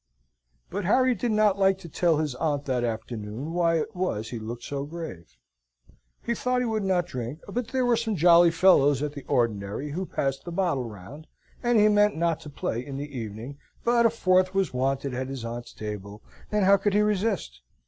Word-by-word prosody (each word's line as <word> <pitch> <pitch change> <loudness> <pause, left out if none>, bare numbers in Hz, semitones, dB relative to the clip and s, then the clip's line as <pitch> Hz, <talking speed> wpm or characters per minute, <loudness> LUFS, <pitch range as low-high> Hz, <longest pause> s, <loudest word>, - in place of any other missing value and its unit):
But 200 +1 -3
Harry 255 +6 +4
did 235 +1 -2
not 210 -2 +3
like 195 -1 +4
to 190 -3 -11
tell 165 0 +1
his 150 -3 -1
aunt 145 +1 -1
that 125 -3 0
afternoon 115 +4 -4
why 170 -1 +2
it 175 +7 -3
was 115 - -2
he 120 - -4
looked 115 +2 -7
so 140 -1 -4
grave. 145 - -8 0.9
He 235 - 0
thought 250 +1 0
he - - 0
would 220 -2 -1
not 185 -3 +1
drink, 130 -1 -5
but 230 +3 -3
there 255 0 0
were 245 -1 +4
some 225 -2 -1
jolly 170 0 +6
fellows 150 -5 +4
at 150 -1 -3
the 140 - -7
ordinary 115 +1 -1
who 185 +5 -3
passed 135 0 -2
the 175 - -7
bottle 170 -8 0
round; 110 - -11 0.3
and 240 -1 +2
he 210 - +6
meant 210 -2 +3
not 165 -1 +1
to 150 - -10
play 125 -4 -3
in 135 0 -7
the 145 0 -6
evening, 115 +4 -6 0.2
but 235 0 +4
a - - +1
fourth 185 -4 +2
was 195 -6 +1
wanted 135 +1 -1
at 130 +1 -3
his 135 -3 -6
aunt's 120 +1 -6
table, 105 -1 -7 0.3
and 210 -2 +2
how 200 +1 +6
could 200 +1 0
he 210 - +5
resist? 200 - -1
160 Hz, 205 wpm, -26 LUFS, 125-195 Hz, 0.9 s, jolly